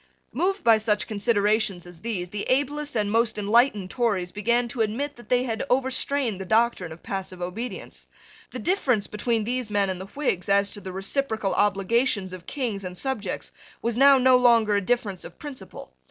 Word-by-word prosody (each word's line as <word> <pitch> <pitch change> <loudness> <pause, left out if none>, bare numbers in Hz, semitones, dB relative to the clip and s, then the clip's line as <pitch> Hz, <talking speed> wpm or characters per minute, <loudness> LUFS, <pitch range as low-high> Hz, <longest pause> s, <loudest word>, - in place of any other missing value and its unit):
Moved 385 +2 0
by 225 -2 +6
such 210 -1 +1
considerations 210 -3 +1
as 175 -2 -12
these, 180 -4 -4
the 205 -1 -4
ablest 290 +2 0
and 205 -2 0
most 225 0 +2
enlightened 210 -2 +2
Tories 205 -8 0
began 235 +4 +1
to 240 -1 -2
admit 255 +7 -1
that 240 -3 -15
they 250 0 +3
had 225 -3 -2
overstrained 260 -4 0
the - - -3
doctrine 220 -4 +1
of 160 - -11
passive 190 -2 -5
obedience. 195 +8 -6 0.4
The - - -7
difference 265 - +1
between 225 +1 -1
these 245 0 -2
men 200 -2 +1
and 185 0 -6
the 190 - -7
Whigs 200 -11 -1
as 200 0 +3
to 205 - -6
the 190 - -7
reciprocal 215 +2 -1
obligations 205 0 +1
of 185 -1 -10
Kings 235 -8 -3
and 180 -1 -6
subjects 215 -4 -3 0.3
was 235 0 0
now 275 +2 +7
no 255 0 +5
longer 230 -4 +4
a 200 - +2
difference 200 -3 -1
of 170 - -11
principle. 290 -3 -9
220 Hz, 185 wpm, -25 LUFS, 195-250 Hz, 0.4 s, now